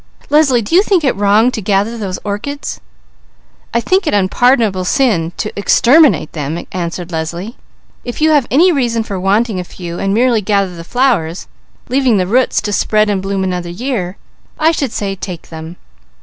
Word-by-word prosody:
"Leslie, 280 -6 +4
do 205 - -6
you 365 - +7
think 385 -5 +1
it 270 - +1
wrong 205 +4 +3
to 220 - -4
gather 205 +3 0
those 195 -5 -4
orchids?" 215 +8 -5 0.9
"I 235 - +1
think 370 - +1
it 300 - +1
unpardonable 205 0 +2
sin 180 -7 +1
to 215 - -4
exterminate 235 - +4
them," 155 +2 -4
answered 175 0 -4
Leslie. 170 +8 -4 0.5
"If 245 - -6
you 315 +1 +3
have 290 -5 +3
any 340 +8 +4
reason 240 -7 0
for 200 -4 -5
wanting 200 +2 +1
a - - -3
few, 175 -1 -8
and 195 - -1
merely 235 +1 +2
gather 200 -2 0
the 165 - -8
flowers, 195 -7 0 0.4
leaving 255 -3 +2
the 185 - +1
roots 245 +7 +1
to 205 0 -3
spread 215 +1 +2
and 195 -2 -1
bloom 195 0 -2
another 180 -2 -3
year, 195 -2 -3 0.4
I 315 +1 +3
should 280 -7 -2
say 200 -3 -3
take 180 -3 -8
them." 160 +1 -8
205 Hz, 175 wpm, -15 LUFS, 185-250 Hz, 0.9 s, you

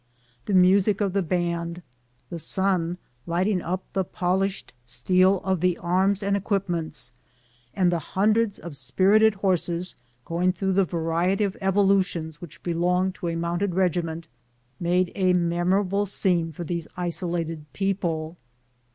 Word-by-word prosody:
The 200 - 0
music 190 +2 +4
of 200 -3 0
the 200 - +2
band, 170 0 -2 0.5
the 170 - -4
sun 180 -1 +1 0.3
lighting 180 +3 +1
up 185 +2 -3
the 190 - +1
polished 190 0 -2
steel 185 +10 +2
of 190 -2 0
the 180 0 +1
arms 190 +3 +1
and 200 0 +1
equipments, 180 - -1 0.6
the 175 -3 +2
hundreds 210 +6 +1
of 170 -4 -9
spirited 195 - +3
horses 180 -2 -1 0.3
going 180 +2 +1
through 190 +1 -1
the 195 0 +3
variety 170 +4 0
of 195 -2 -1
evolutions 190 -5 +1
which 170 -3 -11
belong 180 +2 +1
to 180 - -6
a 165 - -2
mounted 170 +3 -1
regiment, 170 -3 0 0.5
made 175 +1 +1
a 185 -2 +2
memora 175 +3 +1
ble 200 +2 0
scene 175 -4 +1
for 165 +3 -7
these 170 -1 -3
isolated 170 -3 -3
people. 175 -4 -2
180 Hz, 135 wpm, -25 LUFS, 170-195 Hz, 0.6 s, music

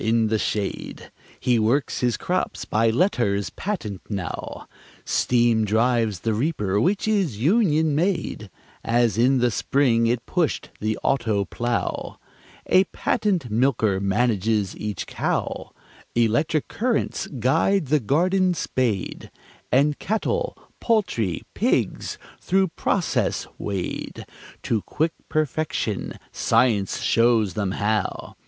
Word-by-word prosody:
In 110 0 +2
the 110 0 +1
shade 105 -2 -3 0.3
He 125 -2 +2
works 120 +7 +1
his 120 -3 +1
crops - - -2
by 115 +2 +2
letters 110 - +1
patent 120 - -4
now: 95 -5 -5 0.4
Steam 120 -2 +2
drives 110 -2 +1
the 115 - 0
reaper 105 - 0
(which 195 - +1
is 195 - +1
union 160 - +3
made), 165 - -1 0.3
As 120 -3 +2
in 130 +3 +4
the 125 -1 +2
spring 115 -1 +2
it 120 0 0
pushed 175 -4 -1
the 110 +1 -1
auto 110 -7 +1
plough; 120 +5 -3 0.5
A 190 +1 +4
patent 180 - -1
milker 110 -4 +2
manages 105 0 +1
each 105 -3 -4
cow; - - -2 0.4
Electric 120 +7 +1
currents 240 0 -1
guide 150 - +2
the 150 +1 +4
garden 180 - +2
spade, 120 - -2 0.4
And 145 +3 +3
cattle, 475 - -1 0.2
poultry, 120 - 0
pigs - - 0 0.2
through 190 0 +1
"process" 175 +2 0
wade 95 -3 -4 0.4
To 110 -3 0
quick 160 +8 -1 0.2
perfection 155 -8 -1 0.2
Science 105 -6 +1
shows 115 -5 +3
them 100 -2 -1
how. 105 -1 -2
120 Hz, 115 wpm, -23 LUFS, 110-155 Hz, 0.5 s, in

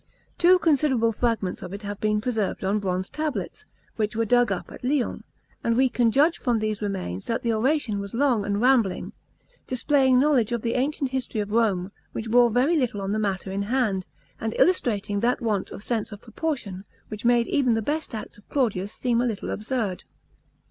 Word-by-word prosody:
Two 360 +2 +6
considerable 280 -8 +2
fragments 220 -5 -1
of 180 - -7
it 205 +1 -7
have 205 0 -5
been 210 0 +1
preserved 220 -5 -1
on 200 +3 +1
bronze 185 -1 -2
tablets, 305 -2 -4 0.3
which 215 0 -1
were 230 +1 +1
dug 245 +2 +3
up - - -4
at - - -11
Lyons, 260 0 0 0.4
and 230 0 +1
we 260 0 +4
can 240 -1 +2
judge 295 +8 +3
from 245 -4 +1
these 215 -1 -2
remains 190 - -4
that 230 - -1
the 230 -1 +1
oration 240 -2 +1
was 200 +2 -6
long 250 -5 +2
and 200 0 -1
rambling, 240 -6 +2 0.5
displaying 260 0 +3
knowledge 260 -5 +3
of 235 -2 -2
the 230 - 0
ancient 275 +1 -1
history 260 -4 -2
of 205 0 -3
Rome, 205 -5 +1 0.2
which 225 0 -4
bore 240 0 +6
very 255 +9 +2
little 250 -9 0
on 195 0 -3
the 215 - 0
matter 195 -2 -2
in 195 +1 -2
hand, 205 -4 0 0.3
and 220 -1 -3
illustrating 210 - +2
that 240 +3 +1
want 215 -6 -1
of 200 - -9
sense 225 -2 -2
of 205 - -8
proportion, 225 - -4 0.3
which 215 -1 -7
made 240 0 +4
even 255 -4 +2
the 225 - 0
best 300 -1 -2
acts 215 - -8
of 210 - -24
Claudius 210 -8 0
seem 240 -2 0
a - - +1
little 215 -4 -3
absurd. 215 -4 -2
230 Hz, 195 wpm, -25 LUFS, 205-255 Hz, 0.5 s, Two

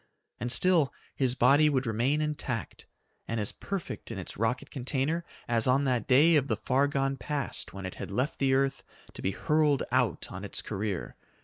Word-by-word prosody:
And 120 +1 -1
still 165 0 +4 0.2
his 130 -2 +1
body 140 +5 +5
would 135 -2 0
remain 120 +7 +1
intact 145 -6 -4 0.4
and 115 0 -2
as 105 - 0
perfect 195 -4 -5
in - - -5
its - - -5
rocket 115 +4 -1
container 140 +5 -1 0.2
as 115 -1 +1
on 130 +2 +3
that 125 -5 0
day 150 +6 +6
of 140 -2 +1
the - - 0
far 135 +2 +2
gone 135 -1 -1
past 145 -1 -2
when 95 0 -7
it 95 - -5
had - - -5
left 125 +9 -2
the 135 -1 +3
earth 135 0 0 0.3
to - - -9
be - - 0
hurled 150 +7 +2
out 125 -7 +1
on 95 +2 -7
its 100 - -3
career. 100 -3 -4
130 Hz, 190 wpm, -29 LUFS, 115-145 Hz, 0.4 s, day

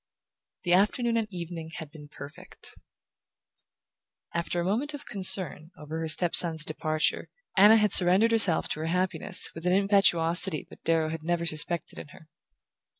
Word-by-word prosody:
The 175 - 0
afternoon 230 +5 +1
and 225 -2 -1
evening 170 -3 -8
had 155 -2 -9
been 150 -2 -14
perfect. 145 0 -10 1.6
After 170 +1 -3
a - - -2
moment 255 +10 -2
of 290 0 -11
concern 190 -5 +2
over 155 +2 -8
her 165 - -4
step 165 +2 -1
son's 160 -3 +3
departure, 155 0 -2 0.3
Anna 210 +3 +6
had 210 -2 +1
surrendered 190 +5 +5
herself 210 -8 +1
to - - -4
her 160 - -4
happiness 185 +3 0
with 165 +2 -7
an 180 - +2
impetuosity 185 -4 +2
that - - -15
Darrow 160 -1 0
had 160 0 -6
never 170 +1 -3
suspected 160 +1 -1
in - - -10
her. 155 +2 -18
175 Hz, 155 wpm, -26 LUFS, 160-195 Hz, 1.6 s, Anna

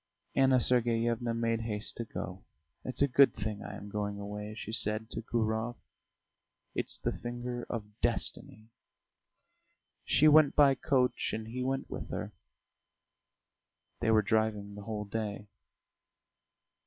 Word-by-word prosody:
Anna 135 -1 +4
Sergeyevna 120 -1 +1
made 115 0 0
haste 105 -2 -3
to 115 - -3
go. 95 -4 -6 0.4
"It's 130 +2 +1
a - - +4
good 140 +1 +5
thing 105 0 -4
I - - -7
am 100 - -9
going 105 -1 -2
away," 105 +1 -6
she 110 0 -6
said 110 +1 0
to - - -3
Gurov. 110 +1 -1 1.0
"It's - - -2
the - - -1
finger 120 0 -5
of 105 -2 -6
destiny!" 110 +1 +1 1.3
She 155 - +4
went 155 -1 +6
by 140 -2 +6
coach 125 -2 +1
and 110 0 -4
he 125 +2 -4
went 135 +1 -1
with - - -6
her. - - -4 1.7
They 110 - 0
were 110 -1 +5
driving 105 -1 0
the 105 - -8
whole 105 -2 -4
day. 105 0 -4
115 Hz, 135 wpm, -31 LUFS, 105-125 Hz, 1.7 s, went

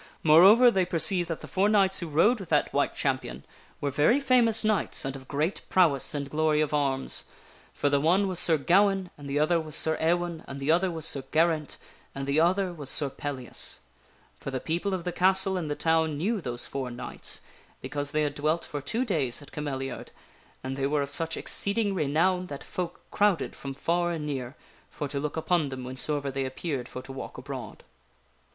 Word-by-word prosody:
Moreover, 195 +11 +7
they 190 -4 +2
perceived 175 0 +3
that 165 - -4
the - - -9
four 195 +2 +1
knights 195 -2 +3
who 170 - -5
rode 170 +11 +3
with 195 - -9
that - - +1
White - - 0
Champion 65 +3 -2 0.3
were 145 - -2
very 155 - +3
famous 245 -5 +3
knights 215 -8 +1
and 135 0 -4
of 130 -1 -11
great 155 +7 -2
prowess 160 -6 +3
and 140 -1 -3
glory 155 +1 +1
of 155 -1 0
arms. 135 -2 0 0.5
For - - 0
the 140 0 +2
one 185 +6 +3
was 185 -2 +2
Sir 165 -2 +6
Gawaine, 190 +4 +2
and 145 -1 -10
the 140 - -1
other 160 +3 +2
was 155 -1 -2
Sir 160 -1 +3
Ewaine, 170 0 0
and 140 0 -7
the 140 +3 +1
other 180 +3 +2
was 160 -2 -2
Sir 145 -4 +3
Geraint, 160 -2 +1 0.4
and 135 0 -4
the 140 +2 +1
other 180 +2 +1
was 145 -5 -3
Sir 140 -1 +3
Pellias. 135 -5 -2 0.6
For - - -6
the 130 -1 -3
people 175 +7 -2
of 180 - -6
the 180 - -3
castle 190 +2 +4
and 170 -5 -3
the 145 - -2
town 160 -2 +1
knew 205 +6 -1
those 120 -4 -2
four 130 +1 -5
knights, 120 - -5 0.4
because 145 -1 -3
they 155 +1 0
had 145 -1 -1
dwelt 155 +3 -1
for 145 - -6
two 225 - -2
days 145 - 0
at 145 - -15
Cameliafd, 135 -3 -5 0.6
and 130 0 -4
they 135 0 0
were 145 0 0
of 140 - -6
such 165 +2 +2
exceeding 200 0 -1
renown 180 +3 +1
that 140 -3 -8
folk 180 -2 -5
crowded 205 -7 +1
from 135 -1 -7
far 175 +4 0
and 165 -3 -4
near 135 -2 -5 0.3
for 145 - -5
to 140 0 -3
look 150 +2 -4
upon 160 -2 0
them 130 -1 -7
whensoever 140 +2 -2
they 135 0 -2
appeared 130 -1 -4
for 125 - -8
to 135 - -9
walk 135 - -8
abroad. 130 0 -8
155 Hz, 205 wpm, -27 LUFS, 140-180 Hz, 0.6 s, Moreover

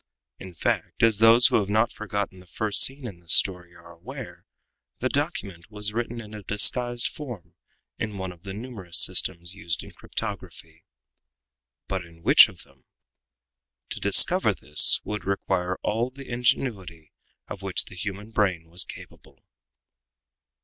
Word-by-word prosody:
In 95 -2 -10
fact, - - -2
as 110 -3 +4
those 115 +2 +7
who - - +5
have 100 -1 -3
not 110 +2 +2
forgotten 100 -3 -4
the 90 - -17
first 105 +4 0
scene 135 0 +1
in 100 -7 -8
this 85 -1 +1
story 90 -2 +1
are - - -15
aware, - - -10 0.5
the 130 - -1
document 110 - -4
was 105 -1 -2
written 120 +1 -3
in 110 -2 -10
a 105 - -8
disguised 120 +5 +2
form 125 - -9 0.5
in 105 -3 -4
one 95 -1 -4
of 85 -2 -16
the 95 +1 -8
numerous 105 -7 -5
systems 90 -1 +1
used 85 -1 -4
in - - -12
cryptography. 90 -6 -7 1.0
But 95 -2 -3
in 85 -1 -18
which - - +8
of - - -13
them? - - -25 1.1
To - - -4
discover - - +4
this 75 +1 +5
would 105 0 -5
require 95 -2 -1
all 115 +4 0
the 135 +1 -12
ingenuity 105 - -2 0.4
of 100 - -8
which 95 -2 +1
the - - -13
human 100 +3 -6
brain 95 -7 -1
was 90 +1 +2
capable. - - -14
100 Hz, 155 wpm, -25 LUFS, 90-115 Hz, 1.1 s, which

